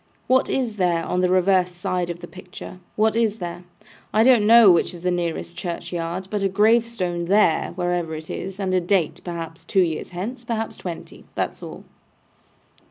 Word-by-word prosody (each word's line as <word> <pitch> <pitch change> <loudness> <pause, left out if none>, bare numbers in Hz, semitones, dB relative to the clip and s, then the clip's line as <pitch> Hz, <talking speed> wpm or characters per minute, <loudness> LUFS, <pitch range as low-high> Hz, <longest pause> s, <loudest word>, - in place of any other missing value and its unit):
What 260 +1 +3
is 240 -5 -1
there 175 -3 +1
on 180 - 0
the 180 - +2
reverse 185 0 +3
side 175 0 -2
of 170 0 -6
the - - -8
picture? 185 0 -11 0.2
What 220 +1 +2
is 225 -2 +1
there? 175 -1 -6 0.5
I 220 - +4
don't 235 -4 +5
know 230 -3 +8
which 175 +1 +1
is 170 - -11
the 180 0 0
nearest 170 -1 -3
churchyard, 175 +1 -4
but 210 -1 -1
a 195 - +1
gravestone 210 -4 +1
there, 190 -3 +3
wherever 175 -3 -1
it 155 0 -8
is, 190 +1 -6
and 190 -2 -1
a 185 - +3
date, 175 -2 0
perhaps 165 -2 -6
two 190 - +2
years 160 -3 -3
hence, 215 +8 -6
perhaps 225 -1 -3
twenty. 175 -3 -8
That's - - -3
all. - - -9
180 Hz, 180 wpm, -23 LUFS, 175-210 Hz, 0.5 s, know